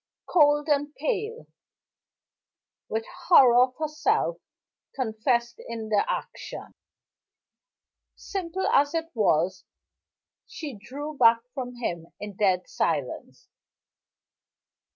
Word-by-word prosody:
Cold 295 -2 +4
and 290 0 0
pale 460 +1 -3 1.4
with 225 +1 -2 0.2
horror 250 -8 +7
of 255 0 +2
herself 315 +11 0 0.6
confessed 235 0 -1
in 225 -2 -5
the 210 -2 +3
action, - - -6 1.4
simple 380 -1 -4
as 285 +3 +3
it 330 0 -2
was 185 -4 +1 0.8
she 300 -4 -7
drew 290 +8 -7
back 230 -3 +5
from 250 -3 -5
him 170 -9 -4
in 205 -1 -7
dead 185 -3 +1
silence. - - -3
260 Hz, 90 wpm, -26 LUFS, 220-310 Hz, 1.4 s, horror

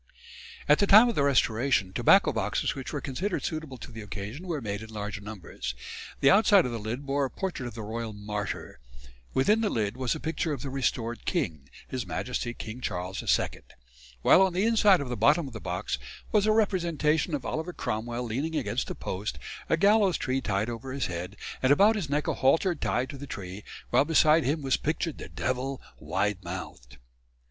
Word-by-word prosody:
'" - - -15
At 150 - +5
the 200 - +3
time 215 +5 +8
of - - 0
the 150 - +1
Restoration 125 -6 +2
tobacco - - +5
boxes - - 0
which - - -6
were - - -3
considered 180 +9 -2
suitable 155 -5 -4
to 120 - -10
the 110 -1 -8
occasion 105 - -7
were 165 -4 -2
made 100 -4 -4
in 110 - -9
large 105 -1 -5
numbers. 90 - -6 0.5
The 135 - +6
outside 200 -1 +6
of 125 - -2
the 115 - -3
lid 115 +6 -4
bore 140 0 +1
a - - -3
portrait 180 -9 -4
of 120 - -8
the 110 - -6
Royal 115 +1 -4
Martyr; 105 0 -5 0.6
within 210 +12 +3
the 215 - +1
lid 110 - -1
was 130 -1 -1
a - - -5
picture 160 0 -2
of 135 -2 -5
the 135 - -4
restored 120 -3 -1
king, 80 - -2 0.2
His 125 -6 -4
Majesty 120 +7 -3
King 110 +3 -7
Charles 90 -3 -3
II; - - +2 0.8
while - - +7
on 190 -2 +3
the 185 +4 +1
inside 210 -6 +5
of 135 - -4
the 125 - -2
bottom 150 +6 +4
of 130 - -8
the 110 - -7
box 90 +3 -3 0.3
was 210 -1 +3
a - - +5
representation 170 -7 +1
of 135 -4 -5
Oliver 160 +8 -3
Cromwell 120 -4 -3
leaning 135 +8 -2
against - - -1
a - - -4
post, 95 +3 -4 0.3
a 165 - +3
gallows 200 0 +4
tree 130 +1 -1
over 115 +5 -2
his 140 - -1
head, 90 +3 -5 0.2
and 130 - +3
about 205 +9 +6
his 185 -9 -3
neck 145 +1 0
a - - +1
halter 160 +7 +3
tied 130 -4 -1
to 140 - -9
the 140 - -7
tree, 95 -3 -7 0.3
while 125 - +5
beside 155 0 +4
him 145 +3 0
was 135 -1 +2
pictured 155 +1 -2
the - - -8
devil, 130 +1 -2 0.2
wide 100 -1 -1
mouthed. 85 -9 -8
130 Hz, 205 wpm, -28 LUFS, 110-160 Hz, 0.8 s, time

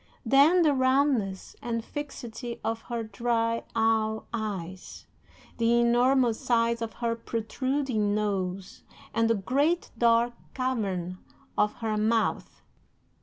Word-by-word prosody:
Then, 285 +9 +5
the 300 -3 +4
roundness 260 -7 +1
and 230 -1 -3
fixity 245 -4 -6
of 225 +1 -2
her 235 -1 -2
dry, 230 +1 -1
owl 220 -1 +1
eyes, 190 -5 -5 0.5
the 230 +1 +3
enormous 240 0 +3
size 235 -1 +1
of 225 -1 -4
her 230 -1 -1
protruding 230 -1 -1
nose, 195 -2 -2 0.3
and 230 0 +2
the 230 - +4
great 280 - 0
dark 235 +1 +3 0.2
cavern 195 -9 -2 0.4
of 210 0 +2
her 220 -1 -1
mouth. 220 +1 0
230 Hz, 115 wpm, -27 LUFS, 215-250 Hz, 0.5 s, Then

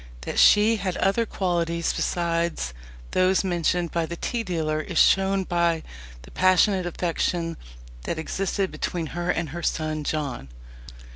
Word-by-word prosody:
That - - -3
she 215 +2 +6
had 190 -3 -3
other 220 +4 +1
qualities 170 -3 -1
besides 170 - -1 0.4
those 185 +1 +3
mentioned 175 -1 0
by 170 -1 -1
the 170 - -5
tea 235 +7 -2
dealer 160 -6 -1
is - - -5
shown 195 0 +4
by 170 -2 0 0.4
the - - -14
passionate 185 0 +3
affection 170 -1 -1 0.5
that - - -2
existed 190 +4 -2
between 170 -2 -3
her 175 +1 -3
and 165 -3 0
her 170 +5 -6
son 155 -2 -1
John. 140 - -3
175 Hz, 140 wpm, -25 LUFS, 165-185 Hz, 0.5 s, she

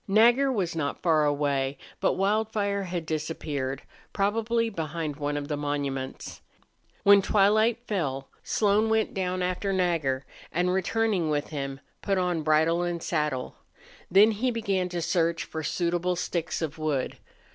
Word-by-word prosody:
Nagger 240 +7 +5
was 185 -8 -1
not 145 -3 -3
far 160 -3 +4
away, 140 -2 0 0.2
but - - +2
Wildfire 205 0 0
had 175 -2 -4
disappeared, 150 -4 -3 0.3
probably 225 +3 +1
behind 160 -6 -4
one 145 0 -2
of 145 -1 -4
the 150 - -1
monuments. 140 -2 -4 0.6
When 200 0 +7
twilight 215 +4 +3
fell 140 - -2
Slone 210 +1 +2
went 220 0 +1
down 185 -1 -1
after 185 +2 -1
Nagger 165 -8 0 0.3
and, 180 +2 +1
returning 190 -2 +1
with 150 -1 -1
him, 135 -2 -5 0.2
put 195 -1 0
on 180 -3 0
bridle 160 +2 +3
and 175 -1 -2
saddle. 150 -6 -2 0.5
Then 205 +4 +6
he 225 +5 0
began 200 -6 -1
to 175 -1 -3
search 170 -1 +1
for 160 - -5
suitable 175 +3 0
sticks 170 -1 -2
of 160 0 -4
wood. 150 -4 -1
175 Hz, 145 wpm, -27 LUFS, 150-200 Hz, 0.6 s, When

